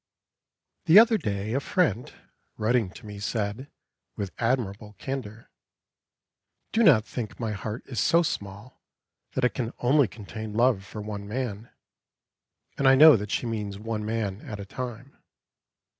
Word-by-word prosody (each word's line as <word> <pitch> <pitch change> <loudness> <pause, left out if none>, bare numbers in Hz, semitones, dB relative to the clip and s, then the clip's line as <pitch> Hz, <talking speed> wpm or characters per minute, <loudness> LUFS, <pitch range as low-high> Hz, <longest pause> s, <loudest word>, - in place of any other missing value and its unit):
The 170 +3 +7
other 225 0 +7
day 100 +1 -3
a 135 - +2
friend, 145 -5 0 0.5
writing 110 -2 +1
to 95 - -13
me, 105 -1 -8
said, 105 +5 -3 0.5
with 100 -2 -4
admirable 110 -4 -1
candour, 115 -1 -6 1.2
"Do 225 - +2
not 130 - +6
think 115 -4 -6
my 115 -2 -2
heart 105 +3 -5
is 125 -5 -4
so 170 +9 +4
small 100 -3 -6 0.5
that 130 - -2
it 125 - +3
can 120 -2 -3
only 135 +1 +3
contain 110 +2 -8
love 120 -3 +2
for 105 +1 -8
one 100 -1 -6
man," 115 -1 -4 1.1
and 140 - +3
I 135 - +7
know 155 +1 +9
that 105 -1 -3
she 120 - -1
means 105 -4 -4
one 110 0 -4
man 105 -2 -3
at 105 -8 -7
a 100 - -6
time. 125 +4 -7
115 Hz, 150 wpm, -26 LUFS, 105-130 Hz, 1.2 s, know